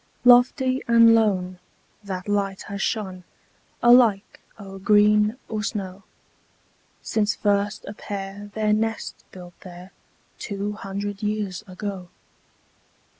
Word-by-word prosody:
Lofty 255 +2 +4
and 230 -1 +6
lone, 185 -5 +1 0.4
that 190 -2 -6
light 200 -2 -1
has 200 -1 -6
shone, 190 -5 -3 0.6
Alike 240 -5 +4 0.2
o'er 195 -1 -10
green 210 +2 +3
or 215 -1 -3
snow, 195 -3 -5 1.0
Since 210 -1 0
first 205 0 -1
a - - -7
pair 200 0 -7
their 215 -1 +1
nest 225 +1 -3
built 180 -1 -12
there, 180 0 -12 0.5
Two 200 0 -4
hundred 200 0 -6
years 210 -3 -3
ago. 185 -1 -6
205 Hz, 110 wpm, -23 LUFS, 195-215 Hz, 1.0 s, and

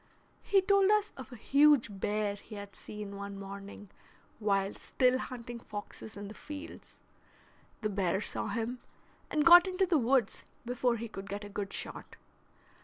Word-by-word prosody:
He 390 -2 +3
told 395 0 +4
us 425 0 +2
of 260 0 -9
a - - -8
huge 275 -5 +4
bear 210 0 0
he 205 +2 -11
had 200 -1 -9
seen 210 -1 -8
one 200 0 -6
morning 200 +1 -9 0.5
while 200 -2 +1
still 255 0 +1
hunting 240 -2 -6
foxes 210 0 -8
in 205 0 -6
the 210 - -8
fields; 295 +7 -9 0.8
the 215 - 0
bear 190 -2 +1
saw - - 0
him, 240 +2 -2 0.5
and 300 -1 +1
got 350 +2 +10
into 375 +1 +1
the 340 -4 +3
woods 255 0 +2 0.2
before 245 0 +1
he 230 0 -5
could 195 -2 -8
get 200 +2 -4
a 205 - -8
good 200 -1 -4
shot. - - -5
225 Hz, 165 wpm, -31 LUFS, 200-280 Hz, 0.8 s, got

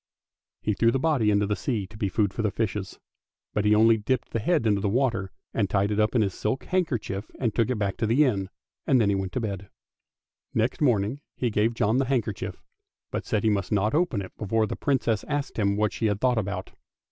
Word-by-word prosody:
He 105 - +1
threw 115 +3 +3
the 135 - +1
body 135 -6 +2
into 105 0 +3
the 105 +1 0
sea 110 -6 -2
to 105 - -14
be 105 -2 -1
food 100 0 +1
for 110 -2 0
fishes, 100 -1 -3 0.6
but 105 - 0
he 105 0 +5
only 110 +1 +5
dipped 125 +4 -1
the 115 - -1
head 155 +3 +1
into 105 -2 +2
the 100 - +1
water, 115 -5 0 0.2
and 100 -4 0
tied 100 +1 +1
it 105 - 0
up 105 +3 +2
in 115 - +4
his 100 -2 -1
silk 110 +8 -2
hand 185 -2 +1
kerchief 105 - -4
and 115 -5 -1
took 115 0 +1
it 125 - +1
back 100 -2 -1
to 115 - 0
the 125 +7 +4
inn, 100 -7 0 0.4
and 130 - +5
he 115 - +4
then 100 -1 +1
went 95 -1 -3
to - - 0
bed. 100 -4 -4 0.9
Next 115 +6 0
morning 120 0 +2
he 120 -2 -1
gave 110 +2 +1
John 110 +2 +2
the 135 - +2
handkerchief, 120 -6 -2 0.5
but - - -4
said 105 - 0
he 110 - +3
must 100 -2 -1
not 105 +1 +2
open 150 - +1
it 95 - -11
before 110 +1 +1
the - - -4
Princess 120 -6 0
asked 145 -4 -2
him 100 -1 +2
what 105 -2 +1
she 115 - 0
had 105 -1 0
thought 125 -1 +2
about. 100 -2 -4
110 Hz, 235 wpm, -26 LUFS, 100-120 Hz, 0.9 s, he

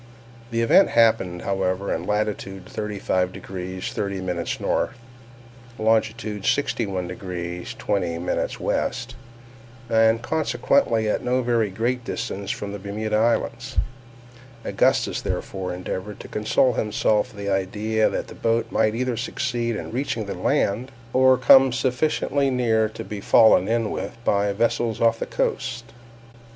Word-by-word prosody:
This 115 -1 0
event 155 +12 +5
happened, 110 -7 +2
however, 95 0 -1
in 85 +2 -4
latitude 105 -3 -2
35 100 -4 -2
degrees 95 -1 -6
30' 95 -4 -2
north, - - -1 0.8
longitude 110 -2 0
61 100 -10 0
degrees 90 -1 -6
20' 85 -4 -1 0.4
west, - - -2 0.8
and 110 0 +4
consequently 120 -6 +1
at 105 - 0
no 125 +1 +1
very 115 -3 +1
great 120 +5 -1
distance 100 -4 -4
from 105 -3 -3
the 100 - -6
Bermuda 105 +2 -3
Islands. 120 +3 0 0.9
Augustus - - +1
therefore 95 -1 -3
endeavored 95 +3 -5
to - - -9
console 110 +4 +2
himself 105 +1 +1
with 105 - -16
the 100 - +1
idea 105 +3 +1
that - - -3
the - - -10
boat 115 0 0
might 110 0 +2
either 125 0 -1
succeed 120 0 -2
in - - -6
reaching 120 -3 -2
the 100 - -4
land, 120 +7 0 0.2
or 130 0 +5
come 135 0 +7
sufficiently 135 +2 0
near 115 -4 +2
to 110 - -7
be 105 -2 -6
fallen 100 -2 +5
in 115 -1 0
with 100 +5 -5
by 100 0 +2
vessels 115 +1 0
off 115 0 +3
the - - -3
coast. 125 -3 -2
110 Hz, 135 wpm, -23 LUFS, 100-120 Hz, 0.9 s, come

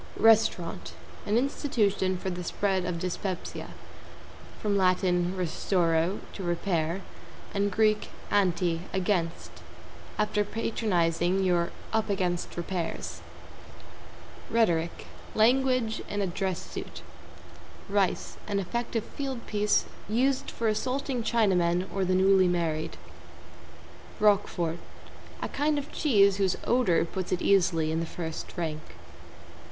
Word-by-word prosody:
=RESTAURANT= 175 - +3 0.3
An 210 +2 +3
institution 215 -8 +1
for 190 +1 -3
the 180 0 -4
spread 190 0 0
of 180 -1 -2
dyspepsia. 185 +1 -4 0.9
From 205 -1 0
Lat. 185 -2 +4
restauro, 180 -1 +1
to - - -7
repair, 175 0 -1 0.5
and 200 0 +1
Grk. 215 +1 +2 0.3
anti, 175 -4 +2
against. 180 -3 -1 0.7
After 210 0 +1
patronizing, 190 -5 0
you're 175 -2 +2 0.2
"up 220 -1 +1
against 180 -4 -1
repairs." 175 0 -4 1.3
=RHETORIC= 170 -8 +1 0.3
Language 250 0 +3
in 205 - -2
a 200 - +1
dress 185 0 -2
suit. - - -7 0.8
=RICE= 200 -2 0
An 205 -1 -1
effective 230 +3 -2
field 265 -4 -5
piece, 210 0 +2 0.2
used 260 +5 +1
for 230 - -2
assaulting 255 +4 -1
Chinamen 185 -6 +2
or 195 -1 0
the 185 0 +2
newly 190 0 +5
married. 165 -3 -1 1.2
=ROQUEFORT= 180 -5 +2 0.6
A - - -1
kind 295 +1 +1
of 285 0 -4
cheese 200 -10 +4
whose 190 -2 +2
odor 220 -10 +3
puts 185 +1 -5
it 180 - 0
easily 170 -5 +3
in 160 - 0
the 165 - -2
first 160 +1 -6
rank. 155 -3 -2
190 Hz, 115 wpm, -28 LUFS, 175-215 Hz, 1.3 s, newly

